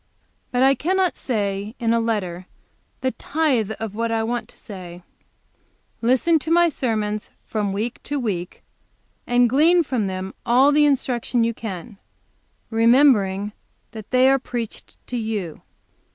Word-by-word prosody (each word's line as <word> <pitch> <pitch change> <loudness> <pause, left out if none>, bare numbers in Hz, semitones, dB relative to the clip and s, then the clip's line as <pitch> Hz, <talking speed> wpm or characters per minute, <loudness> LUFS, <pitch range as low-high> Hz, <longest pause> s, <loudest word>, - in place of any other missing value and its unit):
"But 250 +1 +1
I 270 +1 +6
cannot 370 +5 0
say, 205 -2 -2
in 230 -2 +1
a 230 - +3
letter, 185 -6 -2 0.5
the 260 - 0
tithe 260 -11 0
of 220 -3 -4
what 230 +2 -2
I 225 -1 0
want 240 +1 -3
to - - -18
say. 180 -3 -10 1.0
Listen 260 +8 +3
to 315 - -6
my 345 +1 +5
sermons 215 -7 -2 0.2
from 210 -3 -2
week 220 +5 -3
to 290 - -2
week 185 -8 -4 0.6
and 245 0 +4
glean 325 +8 +4
from 245 -8 -1
them 190 0 -5
all 255 +4 +4
the 295 0 +4
instruction 250 -3 0
you 230 0 0
can, 200 -3 -7 0.7
remembering 225 -4 +4 0.4
that 220 -3 -9
they 255 +1 +4
are 270 0 +4
preached 240 -3 -6
to 250 - -4
you. 215 -8 -4
230 Hz, 145 wpm, -22 LUFS, 210-260 Hz, 1.0 s, I